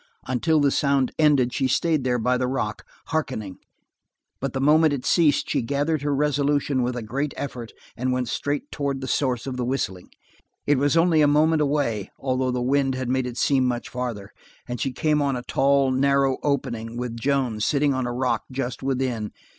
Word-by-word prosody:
Until 155 +5 +1
the 140 -1 +3
sound 140 -3 +1
ended 140 -5 +3
she 130 - +1
stayed 155 +2 +1
there 125 -1 +1
by 125 +2 +1
the 125 0 0
rock, 110 -5 -3 0.3
hearkening, 130 - -3 0.8
but 135 -1 -3
the 135 - -2
moment 150 +2 +4
it 135 -3 -4
ceased 160 -5 +3
she - - 0
gathered 145 +5 -1
her 145 -1 0
resolution 145 -1 +1
with 125 0 -1
a 120 - -4
great 140 +7 -3
effort 125 -5 -5 0.2
and 130 +1 -1
went 125 -1 -1
straight 145 +5 -3
toward 140 -2 -2
the 130 - -4
source 125 -5 0
of 130 -2 -4
the 125 - -1
whistling. 120 -8 -3 0.6
It 145 -2 +3
was 145 +4 +2
only 165 -2 +4
a 145 - +5
moment 155 +2 +3
away, 140 -9 0
although 130 -1 -1
the 125 -1 -1
wind 135 0 +1
had 130 -1 -3
made 130 0 0
it 120 -1 -7
seem 135 -2 +2
much 120 -1 -2
farther, 120 -6 -5 0.4
and 125 -1 -4
she 135 - 0
came 150 +3 +1
on 140 -2 +1
the 125 - -5
tall, 135 +1 +2
narrow 135 0 +2
opening 120 -5 -2
with 120 -1 -4
Joan 130 -4 0
sitting 140 +5 +2
on 130 -1 -1
a - - -2
rock 125 +1 -1
just 130 -1 -4
within. 130 -5 -2
130 Hz, 195 wpm, -24 LUFS, 125-145 Hz, 0.8 s, a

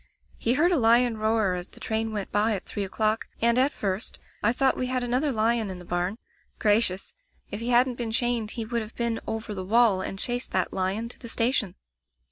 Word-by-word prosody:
He 235 - +2
heard 340 +6 +3
a 350 - +3
lion 235 0 +4
roar 215 -3 +2
as 180 0 -4
the - - -17
train 220 0 -1
went 205 -3 -4
by 210 +1 +2
at 195 - -5
three 205 - -4
o'clock, 215 +3 0
and, 235 0 +3
at 270 +3 +3
first, 195 -2 -2 0.2
I 210 - +3
thought 265 +2 +2
we 255 - -2
had 255 0 -1
another 255 +4 +1
lion 225 -2 +1
in 185 - -5
the 180 - -11
barn. 175 +4 -2 0.4
Gracious! 205 -3 +1 0.4
If 205 - -3
he 235 +2 -3
hadn't 245 0 +3
been 235 -2 -1
chained 235 -1 +1
he 225 - -2
would 235 +1 -1
have 220 +1 -9
been 235 -1 -1
over 220 -1 -4
the 190 -2 -5
wall 215 -1 +4
and 195 - -4
chased 245 +3 -2
that 185 -2 0
lion 195 +4 -1
to - - -11
the 235 - -9
station. 230 -6 +1
225 Hz, 220 wpm, -26 LUFS, 205-240 Hz, 0.4 s, lion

